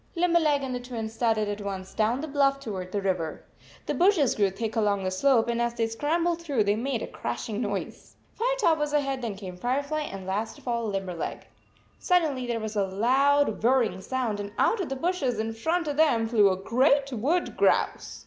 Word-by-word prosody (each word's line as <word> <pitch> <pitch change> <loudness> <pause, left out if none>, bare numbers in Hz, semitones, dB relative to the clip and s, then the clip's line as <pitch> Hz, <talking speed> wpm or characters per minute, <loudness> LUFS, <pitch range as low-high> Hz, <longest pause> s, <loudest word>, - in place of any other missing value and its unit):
Limberleg 335 -5 +2
and 260 -1 -3
the 250 - -2
Twins 230 -3 -6
started 225 -2 +1
at 205 0 -4
once 190 -2 -5
down 225 +4 +1
the 315 - -4
bluff 275 -1 +2
toward 190 -8 -6
the 200 -1 -2
river. 180 -5 -2 0.4
The - - -1
bushes 350 - +3
grew 200 -2 +2
thick 215 +3 -4
along 205 -3 +1
the 185 - -1
slope, 235 +4 +3
and 235 0 0
as 235 0 -1
they 230 - +1
scrambled 330 +9 0
through 280 -10 +1
them - - -7
they 205 0 +2
made 240 +1 -2
a - - -4
crash - - -5
ing 220 0 -3
noise. 205 -4 -5 0.2
Firetop 455 -9 +1
was 295 0 -1
ahead, 275 -3 0
then 225 -4 -3
came 185 -2 -8
Firefly, 280 +8 -1
and 195 -1 -7
last 205 +7 -3
of 285 - -18
all 235 -2 -1
Limberleg. 190 -4 -4 0.5
Suddenly 310 -9 +1
there 235 -1 -1
was 220 0 -5
a 205 - +2
loud 260 +5 +2
whirring 230 -6 +2
sound, 240 -3 -2
and 205 0 -5
out 450 - +2
of 370 - -4
the 270 - -2
bushes 270 - -1
in 220 +1 -2
front 325 +9 -1
of 290 -1 -2
them 250 -8 +3
flew 215 -3 +4
a 185 - 0
great 270 +7 +2
wood 290 +11 0
grouse - - +1
235 Hz, 210 wpm, -27 LUFS, 210-285 Hz, 0.5 s, flew